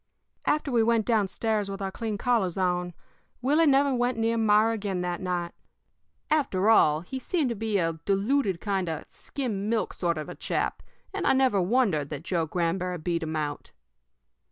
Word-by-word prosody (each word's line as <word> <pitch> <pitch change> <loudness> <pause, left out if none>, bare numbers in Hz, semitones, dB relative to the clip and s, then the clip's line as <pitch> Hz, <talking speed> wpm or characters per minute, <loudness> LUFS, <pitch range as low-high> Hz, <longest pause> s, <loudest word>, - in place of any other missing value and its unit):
"After 295 -2 +1
we 235 -2 +3
went 225 -1 +2
down 220 -4 +2
stairs 210 +1 -1
with 195 +1 -5
our 195 -1 -3
clean 220 0 -3
collars 210 -6 +1
on, 180 -2 0 0.4
Willie 295 +6 +3
never 280 0 +4
went 245 -1 0
near 225 0 +1
Myra 220 0 +4
again 200 -4 -2
that 175 0 -3
night. 175 -2 -2 0.8
After 225 -9 +2
all, 155 -8 +5
he 260 +10 -6
seemed 295 0 0
to 235 - -2
be 220 -1 -1
a 165 -3 -1
diluted 200 -1 +1
kind 190 -3 -1
of 160 -1 -3
a - - -31
skim 215 -7 -4
milk 230 -1 0
sort 170 -2 -1
of 155 - -5
a - - -6
chap, - - -2 0.3
and - - -1
I - - +5
never 260 -7 +3
wondered 180 - +1
that 145 0 -6
Joe 170 -2 -1
Granberry 180 +2 -1
beat 170 +1 -2
him 160 0 -3
out. 150 -2 -4
200 Hz, 185 wpm, -27 LUFS, 175-235 Hz, 0.8 s, all